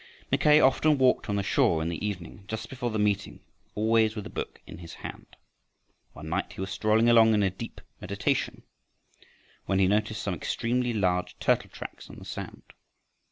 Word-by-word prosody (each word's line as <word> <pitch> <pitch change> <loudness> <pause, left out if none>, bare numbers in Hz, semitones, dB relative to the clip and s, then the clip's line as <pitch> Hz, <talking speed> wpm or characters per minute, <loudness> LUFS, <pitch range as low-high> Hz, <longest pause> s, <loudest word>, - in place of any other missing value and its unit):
Mackay 150 0 +5
often 150 +2 +4
walked 130 -3 +2
on 100 - 0
the 100 - 0
shore 85 -3 +2
in 80 - -2
the 85 - -5
evening 100 -1 -5
just 110 0 -5
before 125 -2 -3
the 110 - -2
meeting, 105 -1 0 0.4
always 110 0 +2
with 105 -2 -5
a - - -8
book - - -5
in 80 - -10
his 85 -2 -10
hand. - - -9 0.8
One 75 - -9
night 85 +5 -2
he - - -7
was 95 0 -4
strolling 110 +3 +2
along 115 -2 +6
in 100 -3 +2
deep 115 +4 -8 0.2
meditation - - -2 1.0
when 95 - +1
he 95 - +4
noticed 105 +2 0
some 100 - -1
extremely 120 +6 -1
large 90 -5 0
turtle - - +1
tracks - - -9
in - - -10
the - - -11
sand. - - -7
105 Hz, 180 wpm, -27 LUFS, 95-115 Hz, 1.0 s, along